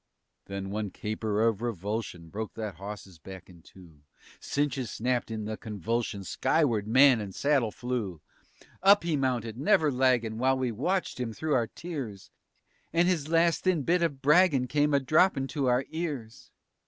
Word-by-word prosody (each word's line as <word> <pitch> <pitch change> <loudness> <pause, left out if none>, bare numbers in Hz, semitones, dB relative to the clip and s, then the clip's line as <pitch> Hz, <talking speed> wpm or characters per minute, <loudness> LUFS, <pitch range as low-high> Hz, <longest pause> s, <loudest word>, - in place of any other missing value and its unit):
_" - - -34
Then 100 0 -5
one 105 0 -2
caper 110 +2 -1
of 110 -2 0
repulsion 105 -5 -4
Broke 110 +4 -6
that 105 -6 -5
hawse's 100 -3 -9
back 95 0 -11
in 85 -2 -17
two. 85 -4 -17 0.4
Cinches 140 -4 -2
snapped 125 +1 -1
in 110 -1 -4
the 110 0 -4
convulsion; 110 0 -3
Skyward 115 - +1
man 130 0 +6
and 100 -2 -7
saddle 140 -6 +2
flew. 110 -7 -4 0.6
Up 200 0 +6
he 170 -2 0
mounted, 125 -4 -1
never 155 -1 +3
laggin', 125 -4 +1
While 130 +1 +2
we 130 -2 -1
watched 175 - -2
him 120 -3 -3
through 155 +5 -2
our 120 -4 +2
tears, 135 - -7 0.6
And 170 +1 +3
his 165 -6 0
last 165 0 +3
thin 180 -6 +1
bit 175 +5 +2
of 145 -5 -1
braggin' 150 -3 +4
Came 145 +1 +2
a - - +4
droppin' 155 +1 +3
to 140 -4 -1
our 125 +2 +2
ears. 145 -9 -5
125 Hz, 165 wpm, -28 LUFS, 105-145 Hz, 0.6 s, man